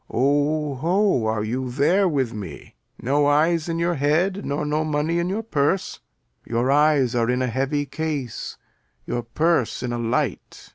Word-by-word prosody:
Lear. - - -3
O, 145 +2 +1
ho, 180 - +2
are 110 -1 0
you 125 +4 -3
there 160 +10 +2
with 135 -6 -1
me? 95 -9 -8 0.3
No 145 +3 +1
eyes 160 +3 +2
in 165 - -1
your 170 +1 +1
head, 170 +7 +1
nor 145 +1 -2
no 150 +1 0
money 155 +2 0
in 170 +1 -1
your 210 +4 -2
purse? 180 -2 -1 0.4
Your 120 +3 0
eyes 145 -4 +3
are 120 -1 +1
in 125 +1 +1
a - - +1
heavy 135 +4 -1
case, 145 -6 -4 0.5
your 120 - -2
purse 130 +2 0
in 120 -1 -2
a 120 - -2
light. 120 0 -3
145 Hz, 175 wpm, -23 LUFS, 125-160 Hz, 0.5 s, eyes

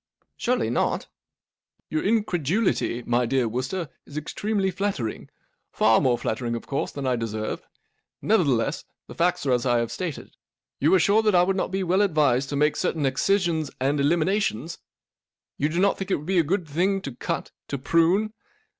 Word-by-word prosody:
" - - -47
Surely 250 +1 0
not? - - 0 0.3
" - - -68
" - - -49
Your 310 - 0
incredulity, 185 - 0
my 120 0 +1
dear 130 -1 +1
Wooster, 130 +10 -3 0.2
is 145 - -9
extremely 195 +5 -1
flattering—far 150 - -1
more 125 -3 +2
flattering, 120 0 -2
of 115 - -6
course, 140 - -2
than 140 -1 -5
I 130 -1 +2
deserve. 110 -2 -3 0.6
Nevertheless, 145 - +1 0.2
the - - -10
facts 175 0 0
are 135 - +1
as 125 -1 +2
I 120 -2 +2
have 115 -1 -1
stated. 170 -2 -5 0.4
You 150 +4 +3
are - - +5
sure 205 +5 +4
that 210 -3 +2
I 175 - +6
would 190 +1 +1
not 190 - -1
be 190 +1 -1
well 185 +2 +2
advised 145 -8 +2
to 145 - -3
make 150 +2 +2
certain 160 -5 0
excisions 160 +2 +1
and 140 +3 +1
eliminations? 165 - 0 0.8
You 150 - +1
do 165 - -3
not 200 +1 +2
think 195 0 -4
it - - +3
would 150 - -7
be 185 +1 +2
a - - +4
good 180 +3 -1
thinglto 170 -3 -1
cut, - - -3 0.2
to 140 - -3
prune 170 +10 +2
160 Hz, 180 wpm, -25 LUFS, 130-190 Hz, 0.8 s, I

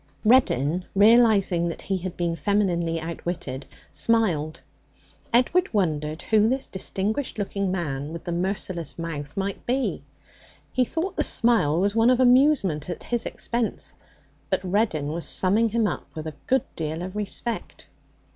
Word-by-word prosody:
Reddin, 180 - +3
realizing 205 -5 +5
that 170 - -5
he 195 - -1
had 185 0 -6
been 170 -1 -1
femininely 170 -2 0
outwitted, 165 -5 -5 0.2
smiled. 160 -3 +1 0.7
Edward 255 +10 +3
wondered 155 -4 -1
who 220 0 +3
this 265 +2 -1
distinguished 205 +8 -3
looking 200 -2 -2
man 150 -5 -3
with 170 0 -7
the 175 - -4
merciless 175 -2 -2
mouth 150 -3 -6
might 195 0 -3
be. 260 +2 0 0.7
He 255 -1 +2
thought 355 +8 -3
the - - +2
smile 220 -10 +3
was 200 +2 +1
one 230 +1 +4
of 255 -1 +3
amusement 250 - +3
at 175 - -5
his 240 -1 -1
expense. 235 -2 -3 0.6
But - - 0
Reddin 185 -6 0
was 165 +2 -3
summing 210 +5 +3
him 225 +1 +1
up 195 - -3
with 155 0 -6
a 155 - -5
good 265 -1 +2
deal 160 +1 -3
of 185 +2 -7
respect. 210 +3 -3
190 Hz, 145 wpm, -25 LUFS, 165-230 Hz, 0.7 s, realizing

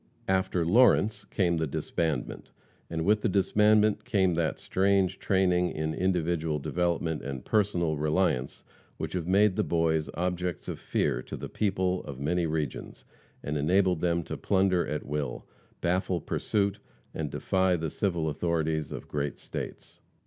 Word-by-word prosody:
After 95 -2 +1
Lawrence 110 +2 +4
came 85 -4 +1
the 80 -1 0
disbandment, 75 0 -3 0.4
and 80 -1 -2
with 105 +2 +3
the 115 - +1
disbandment 105 +2 +3
came 95 -4 +2
that 80 -1 0
strange 95 -1 +1
training 90 -2 +2
in 80 0 -2
individual 85 -3 0
development 85 +1 -1
and 65 -1 -6
personal 90 -7 +1
reliance 75 -3 0 0.3
which - - -4
have 90 -2 -2
made 100 +1 +4
the - - +2
Boys 80 -2 +1
objects 90 -1 -2
of - - -5
fear - - 0
to - - -7
the - - -6
people 95 -3 0
of 70 -2 -7
many 85 +4 0
regions, 75 -4 -4 0.4
and 75 0 -2
enabled 90 +3 +2
them 85 -1 +1
to - - -6
plunder 95 -2 +2
at 75 +1 -3
will, 70 -2 -3 0.4
baffle 90 0 0
pursuit, 100 +5 -1 0.3
and - - -3
defy 95 -1 +1
the 80 -3 -3
civil 85 -5 -1
authorities 80 -1 -1
of - - -7
great 70 -1 -3
States. - - -7
85 Hz, 150 wpm, -28 LUFS, 80-95 Hz, 0.4 s, Lawrence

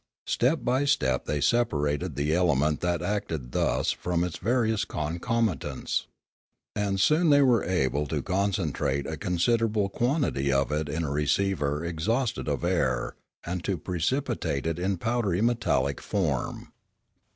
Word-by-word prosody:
Step 135 +7 +1
by 130 +3 +2
step 140 - +1
they 75 - -1
separated 75 -7 +1
the 75 +2 0
element 75 -4 +2
that 85 -1 -1
acted 80 -10 -3
thus - - +1
from 85 -1 -1
its 90 -2 -3
various 110 0 +1
concomitants. 85 - -2 0.7
And 100 -2 0
soon 155 - +4
they 145 -1 +6
were 120 -5 +4
able 75 -4 0
to 75 -1 -2
concentrate 90 -8 0
a - - -3
considerable 105 +3 +1
quantity 120 - 0
of 70 -1 +1
it 75 0 -1
in 80 +3 -2
a 75 - -2
receiver 75 0 0
exhausted 110 +9 -1
of 70 -4 -1
air, 60 0 0 0.3
and 90 0 -4
to 95 -3 -1
precipitate 90 - -1
it 80 +1 -1
in 95 +1 0
powdery 110 -3 0
metallic 115 -11 +1
form. 80 -11 -2
90 Hz, 140 wpm, -27 LUFS, 75-115 Hz, 0.7 s, they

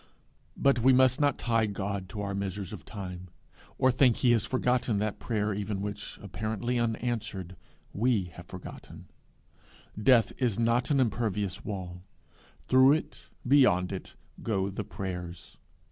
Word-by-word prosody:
But 135 -3 +3
we 130 +3 +5
must 130 +1 +4
not 145 -2 +2
tie 115 -2 +1
God 100 -2 -4
to 105 +4 -5
our 100 -1 -3
measures 100 0 -4
of 90 -8 -8
time, 90 -3 -7 0.5
or 130 - +4
think 125 -2 +4
he 125 - +3
has 115 -4 +2
forgotten 125 -3 +1
that 105 0 -2
prayer 105 -2 -1
even 100 0 -3
which, 100 +1 -5
apparently 110 +4 -2
unanswered, 115 -5 -2 0.4
we 115 -2 +2
have 85 0 -11
forgotten. 95 -1 -10 0.9
Death 120 0 +5
is 120 -6 +1
not 115 +2 +2
an 140 -2 +3
impervious 105 -4 -1
wall; 90 -4 -6 0.6
through 130 - +6
it, 160 - -4 0.2
beyond 120 -10 +4
it, 95 - -7 0.3
go 100 -3 -1
the 105 +2 -4
prayers. 90 -3 -7
105 Hz, 145 wpm, -29 LUFS, 95-120 Hz, 0.9 s, through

